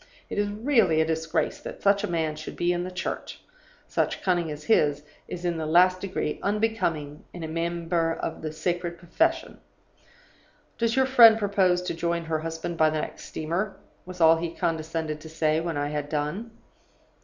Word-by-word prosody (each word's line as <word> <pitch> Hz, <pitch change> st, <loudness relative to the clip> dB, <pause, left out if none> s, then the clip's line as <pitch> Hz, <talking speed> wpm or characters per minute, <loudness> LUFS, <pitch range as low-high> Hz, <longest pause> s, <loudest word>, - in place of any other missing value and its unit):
It -, -, -1 dB
is 205 Hz, 0 st, +1 dB
really 215 Hz, -, +2 dB
a 160 Hz, -, +4 dB
disgrace 160 Hz, 0 st, -1 dB
that -, -, -9 dB
such 200 Hz, 0 st, +4 dB
a -, -, 0 dB
man 160 Hz, -3 st, -1 dB
should 155 Hz, 0 st, -8 dB
be 175 Hz, +1 st, +1 dB
in 175 Hz, 0 st, -2 dB
the 180 Hz, -, -4 dB
Church; 180 Hz, 0 st, -5 dB, 0.5 s
such -, -, -1 dB
cunning 175 Hz, -3 st, +1 dB
as 150 Hz, 0 st, -6 dB
his 150 Hz, -8 st, +2 dB, 0.2 s
is 175 Hz, 0 st, -6 dB
in 170 Hz, -1 st, 0 dB
the 155 Hz, -, -3 dB
last 180 Hz, +3 st, +4 dB
degree 190 Hz, -6 st, -3 dB
unbecoming 195 Hz, -9 st, -1 dB
in 175 Hz, -, -7 dB
a -, -, -3 dB
member 165 Hz, 0 st, -1 dB
of -, -, -5 dB
a 155 Hz, -, -3 dB
sacred 175 Hz, +2 st, -2 dB
profession. 330 Hz, -, 0 dB, 1.2 s
"'Does 230 Hz, 0 st, +1 dB
your 265 Hz, 0 st, +4 dB
friend 235 Hz, -4 st, +8 dB
propose 190 Hz, -4 st, +2 dB
to 180 Hz, -, -2 dB
join 170 Hz, 0 st, -1 dB
her 160 Hz, -1 st, -1 dB
husband 165 Hz, +1 st, -4 dB
by 155 Hz, -1 st, +5 dB
the 155 Hz, 0 st, -1 dB
next -, -, -7 dB
steamer?' 175 Hz, +6 st, -3 dB, 0.3 s
was 180 Hz, 0 st, -10 dB
all 165 Hz, 0 st, +6 dB
he 165 Hz, 0 st, -4 dB
condescended 160 Hz, -1 st, -2 dB
to 160 Hz, -, -10 dB
say, 155 Hz, -1 st, +1 dB
when 165 Hz, -2 st, -3 dB
I 145 Hz, 0 st, -1 dB
had 150 Hz, -1 st, -3 dB
done. 150 Hz, +10 st, -2 dB
170 Hz, 185 wpm, -26 LUFS, 160-185 Hz, 1.2 s, friend